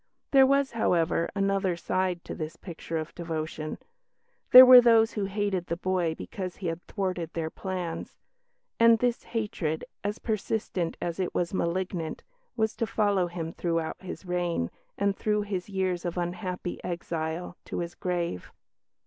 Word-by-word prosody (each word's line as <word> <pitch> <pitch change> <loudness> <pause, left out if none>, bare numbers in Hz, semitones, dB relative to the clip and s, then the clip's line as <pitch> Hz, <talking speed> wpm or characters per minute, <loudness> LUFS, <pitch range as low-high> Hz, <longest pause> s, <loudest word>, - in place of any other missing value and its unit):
There 270 -1 +7
was, 275 0 +2
however, 170 -7 +1
another 195 -2 +1
side 180 0 -1
to - - -5
this 155 +1 -5
picture 165 -2 -6
of 155 0 -5
devotion. 160 -2 -4 0.7
There 255 +1 +12
were 255 -1 +11
those 230 -2 +5
who 205 -2 -2
hated 195 -2 -1
the 170 - -2
boy 175 -3 0
because 185 0 -6
he 190 - -8
had 165 0 -2
thwarted 185 -5 -2
their 160 -1 -3
plans." 185 -3 -5 0.6
And 230 0 +7
this 240 +1 0
hatred, 195 -9 -2 0.2
as 205 +2 -2
persistent 210 -5 -2
as 170 +1 -3
it 185 - -2
was 175 0 0
malignant, 175 -2 -2 0.3
was 220 -2 0
to 230 -1 0
follow 205 -5 +2
him 165 -1 -5
throughout 165 -2 -2
his 190 +1 -8
reign, 175 - -1 0.3
and 200 -1 +1
through 210 0 0
his 195 -2 -4
years 185 -3 -1
of 175 0 -3
unhappy 180 0 -4
exile, 170 0 -3
to - - -5
his 170 0 -3
grave. 175 - -3
180 Hz, 155 wpm, -28 LUFS, 170-205 Hz, 0.7 s, There